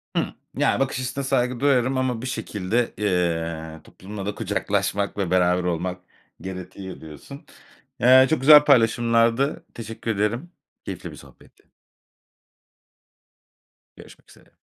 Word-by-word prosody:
Hı, - - +2 0.3
yani, - - +2
bakış 135 -1 -1
açısına 130 +2 -4
saygı 125 -2 0
duyarım 130 -1 +2
ama 125 -3 -1
bir 130 - -5
şekilde, 110 -1 -2
eee, 85 -5 -2
toplumla 100 +1 -9
da 105 - -3
kucaklaşmak 100 -1 -2
ve 95 -4 -2
beraber 90 0 +2
olmak 90 +1 -3 0.4
gerekiyor 95 0 -8
diyorsun. 80 - -11 0.5
Eee, 130 +2 +7
çok 160 - +1
güzel 150 +1 +8
paylaşımlardı, 115 0 +2
teşekkür 115 0 -5
ederim, 115 - -2 0.3
keyifli - - -7
bir - - -11
sohbetti. - - -19 2.3
Görüşmek - - -16
üzere. - - -20
110 Hz, 120 wpm, -23 LUFS, 95-130 Hz, 2.3 s, güzel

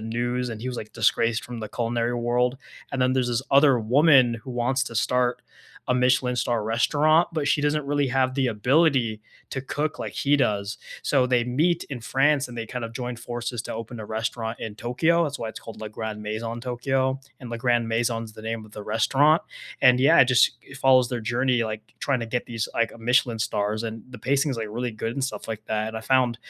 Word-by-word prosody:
news 120 +3 -2
and 110 -2 -6
he 125 - -4
was, 125 - -4
like, 110 -1 -7
disgraced 115 0 +1
from 120 -1 -7
the 110 -1 -5
culinary 120 +2 -1
world. 120 +2 +1 0.4
And 130 - 0
then 130 0 +3
there's 130 -1 +1
this 120 +1 -1
other 140 -1 +6
woman 130 +1 +5
who 130 - -6
wants 125 +2 0
to 115 - -8
start 125 +2 +1 0.5
a - - +4
Michelin 125 0 +2
star 120 -2 0
restaurant, 150 +9 +3
but 155 -3 -1
she 145 - +2
doesn't 150 0 0
really 145 -1 +1
have 130 0 +1
the 135 -1 +1
ability 125 -1 +2 0.3
to 135 - -4
cook 150 +3 -3
like - - -5
he 145 +1 +2
does. 105 -6 0 0.3
So, 130 -3 +2
they 125 -2 +2
meet 160 +8 +1
in 130 -4 -7
France 140 +3 +2
and 120 -1 -9
they 115 - -4
kind 125 +1 -5
of 115 - -7
joined 125 0 -5
forces 120 0 -4
to - - -6
open 115 +1 -6
a 110 - -6
restaurant 110 +1 -3
in 110 -2 -5
Tokyo. 160 +10 +1
That's 145 -3 -2
why 115 - -4
it's 110 - -7
called 110 -1 -11
Le 110 - -5
Grand 105 0 -6
Maison 115 +2 -4
Tokyo. 130 +2 -1 0.2
And 125 - -8
Le 115 - -4
Grand 120 -1 +1
Maison 115 0 0
is 110 -1 -12
the 110 - -11
name 110 -1 -4
of 105 - -19
the 105 - -7
restaurant. 135 +9 +3 0.4
And 125 -1 +6
yeah, 140 +6 +6
it - - +7
just, 130 -1 +4
it 135 - -13
follows 130 -2 +4
their 120 -1 -3
journey, 120 +1 +1
like, 110 -1 -4 0.2
trying 135 -3 0
to 115 - -3
get 120 +2 -2
these, 115 -2 -3
like, 115 0 +1
Michelin 120 0 +2
stars 110 -1 -1
and 115 -1 -5
the 125 - -9
pacing 140 +3 +1
is, 125 - -3
like, 110 -1 -3
really 120 +3 -3
good 115 +1 -4
and 135 +2 -2
stuff 110 -6 -5
like 110 -1 -5
that. 110 0 -1
And 110 - -6
I 110 - -5
found 125 -1 +2
120 Hz, 230 wpm, -25 LUFS, 115-130 Hz, 0.5 s, it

